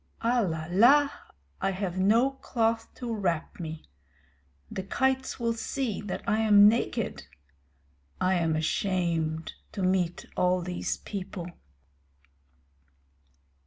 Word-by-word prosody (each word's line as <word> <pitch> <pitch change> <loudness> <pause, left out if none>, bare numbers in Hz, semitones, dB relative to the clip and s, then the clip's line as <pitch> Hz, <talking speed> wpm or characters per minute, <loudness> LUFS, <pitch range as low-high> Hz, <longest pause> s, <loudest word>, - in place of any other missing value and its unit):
Alala! 230 - +3 0.5
I - - +1
have 190 -1 -3
no 225 +8 +4
cloth 230 -4 -1
to 240 -2 -4
wrap 175 -7 -2
me. 160 -2 -6 0.9
The - - -3
kites 265 +8 0
will 230 -1 +1
see 230 0 -3
that 205 -2 -5
I 215 +2 +2
am 205 -2 +7
naked. 220 - 0 0.9
I 185 +1 +2
am 165 -3 +1
ashamed 165 -1 -1 0.2
to 195 - -3
meet 185 -2 0
all 180 0 +2
these 180 0 -3
people. 190 -3 -6
195 Hz, 105 wpm, -28 LUFS, 175-230 Hz, 0.9 s, am